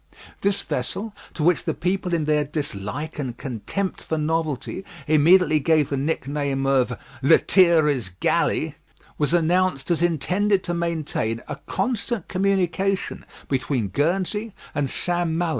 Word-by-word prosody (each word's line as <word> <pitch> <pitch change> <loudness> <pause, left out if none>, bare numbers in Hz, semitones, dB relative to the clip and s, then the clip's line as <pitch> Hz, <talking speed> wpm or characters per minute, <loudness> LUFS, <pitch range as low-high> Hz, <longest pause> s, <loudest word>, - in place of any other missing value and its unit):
This 200 0 +2
vessel, 200 - -3 0.2
to 155 - -2
which 175 0 +3
the 160 - -1
people 180 0 -1
in 160 -2 0
their 150 0 +2
dislike 145 +1 -4
and 125 -4 -4
contempt 135 - -3
for 160 - -2
novelty 155 +2 -2 0.2
immediately 155 +1 +5
gave 150 0 +2
the 140 - -1
nickname 140 -1 -1
of 130 -3 +2 0.2
"Lethierry's 155 - +4
Galley," - - +1 0.4
was 150 0 +2
announced 175 -2 +2
as 170 - +1
intended 185 +5 +1
to 175 - -2
maintain 155 -10 -2
a - - -5
constant 220 -1 -2
communication 195 0 0 0.2
between 130 -5 -1
Guernsey 185 - -1 0.2
and 140 -2 0
St. 175 +2 0
Malo. 165 +1 0
160 Hz, 130 wpm, -23 LUFS, 140-180 Hz, 0.4 s, immediately